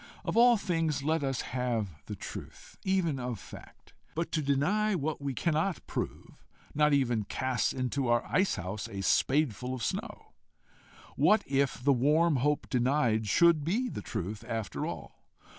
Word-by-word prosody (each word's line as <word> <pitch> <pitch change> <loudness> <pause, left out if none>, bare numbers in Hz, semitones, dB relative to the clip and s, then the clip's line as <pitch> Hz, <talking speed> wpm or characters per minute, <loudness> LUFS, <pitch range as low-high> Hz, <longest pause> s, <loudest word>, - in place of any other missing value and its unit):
Of - - -2
all 240 0 +6
things 165 -7 -1
let 160 +1 +1
us 135 -2 -1
have 115 - -3
the - - -5
truth - - -9
even 180 -7 +1
of 125 -2 -3
fact! - - -14 0.2
But 165 +1 -2
to 155 - 0
deny 180 +10 +1
what 155 -2 -2
we 140 -2 -3
cannot 165 +4 0
prove, - - -6 0.3
not 150 0 +3
even 120 -6 +2
casts 130 0 0
into 130 +1 -1
our 120 0 +2
ice 190 +1 +1
house 95 +5 -5
a 100 -3 -5
spadeful 130 +1 +1
of 125 - -6
snow. 210 +3 -4 0.8
What 215 - +4
if 135 -2 0
the 140 +1 +5
warm 150 +5 +3
hope 145 +3 0
denied 125 -4 +1
should 170 - +4
be 225 - 0
the - - -5
truth 100 +2 -5
after 110 -4 -3
all? - - -8
140 Hz, 160 wpm, -30 LUFS, 120-165 Hz, 0.8 s, all